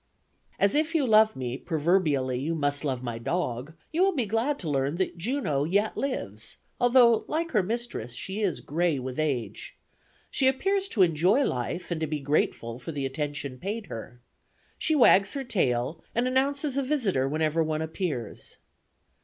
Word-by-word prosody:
"As 200 - +3
if 315 +2 +1
you 295 -4 +3
love 220 -1 +5
me, 125 -1 -3
proverbially, 150 -6 +1
you 160 +5 -1
must 145 -1 0
love 130 -4 -2
my 120 -2 -4
dog, 130 0 -2 0.2
you 330 - 0
will 385 -1 +3
be 250 -5 +1
glad 225 +7 0
to 170 - -6
learn 140 0 0
that 185 0 -1
Juno 175 - -1
yet 200 +7 +1
lives, 110 - -4 0.2
although 245 -2 +5
like 330 +1 -1
her 215 - +3
mistress 205 - -4
she 190 - -4
is 195 -6 0
gray 165 0 0
with 130 +2 -5
age. 130 -9 -2 0.5
She 265 - +3
appears 385 +9 +1
to 215 - +3
enjoy 180 - +3
life 170 - -3
and 165 -2 -2
to 160 - 0
be 150 0 -2
grateful 135 -4 -1
for 145 - -6
the 140 -3 -3
attention 140 -1 -4
paid 205 - -4
her. 115 +2 -8 0.6
She 315 - +1
wags 200 -7 +5
her 275 - -2
tail 155 - 0
and 240 +2 +2
announces 275 +2 0
a - - +3
visitor 225 - 0
whenever 155 +2 +1
one 155 0 -1
appears. 160 - -4
170 Hz, 170 wpm, -27 LUFS, -, 0.6 s, love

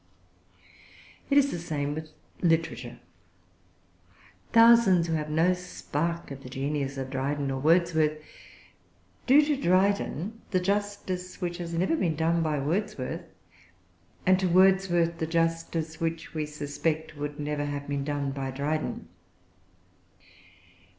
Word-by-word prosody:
It 280 - +4
is 280 0 +4
the 175 - -3
same 145 -3 -2
with 155 +1 -6 0.3
literature. 125 -8 0 1.5
Thousands, 230 -6 +6
who 165 - -2
have 155 -1 -2
no 165 +4 +3
spark 170 -3 -4
of 135 -1 -7
the 125 - -10
genius 140 +1 -2
of 130 0 -5
Dryden 140 +1 -1
or 135 - -2
Wordsworth, 160 -1 +3 1.1
do 290 +3 +7
to 295 -1 +1
Dryden 200 - +1
the 185 - +2
justice 195 -1 -2
which 175 -1 -3
has 170 -1 -4
never 185 - +1
been 170 - 0
done 165 +2 +1
by 155 -2 0
Wordsworth, 170 0 -2 1.0
and 185 0 +5
to 190 - +1
Wordsworth 180 -2 +3
the 160 - -1
justice 165 -1 -1
which, 165 0 -3
we 155 -2 -2
suspect, 150 +2 -3
would 145 0 -5
never 145 0 -2
have 145 0 -4
been 140 -1 -2
done 145 -1 -2
by 135 -1 -4
Dryden. 145 - -3
165 Hz, 130 wpm, -27 LUFS, 145-180 Hz, 1.5 s, do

